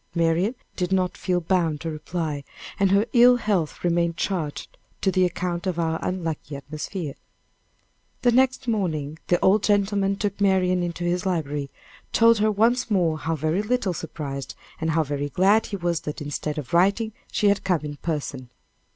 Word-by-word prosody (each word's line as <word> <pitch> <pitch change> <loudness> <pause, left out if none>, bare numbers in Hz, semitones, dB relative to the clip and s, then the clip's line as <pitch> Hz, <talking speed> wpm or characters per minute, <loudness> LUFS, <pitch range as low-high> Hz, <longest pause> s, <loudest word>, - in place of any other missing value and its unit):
Marian 170 +7 +2 0.2
did 180 -1 -2
not 185 -1 +1
feel 180 -2 0
bound 165 -3 0
to 165 - -3
reply, 155 -1 -4 0.4
and 195 -1 +4
her 200 +3 +4
ill 245 0 +7
health 200 -9 -1
remained 170 -1 +1
charged 160 -7 -3 0.2
to 190 - +1
the 185 -1 +3
account 175 0 -2
of 180 -2 -1
our 160 -1 0
unlucky 165 -5 -3
atmosphere. 150 +3 -5 1.1
The 245 - +5
next 260 +1 +2
morning, 160 -9 -1
the 175 - +3
old 195 +2 +4
gentleman 200 -1 +2
took 200 0 -3
Marian 185 -2 +3
into 175 0 -3
his 175 +2 0
library, 150 -5 -2 0.4
told 230 -1 +5
her 215 +1 +3
once 235 +4 +2
more 170 -6 +1
how 165 +1 -1
very 160 +5 0
little 215 -3 0
surprised, 145 -4 -6 0.2
and 160 - -1
how 160 0 +2
very 145 0 -3
glad 195 +8 +3
he 205 - -4
was 175 -3 -1
that 150 -2 -6
instead 150 +1 -4
of 145 -2 -6
writing, 200 +5 +3 0.2
she 205 - +3
had 200 - +1
come 180 -4 +1
in 145 -1 -6
person. 145 -6 -4
175 Hz, 170 wpm, -24 LUFS, 155-200 Hz, 1.1 s, ill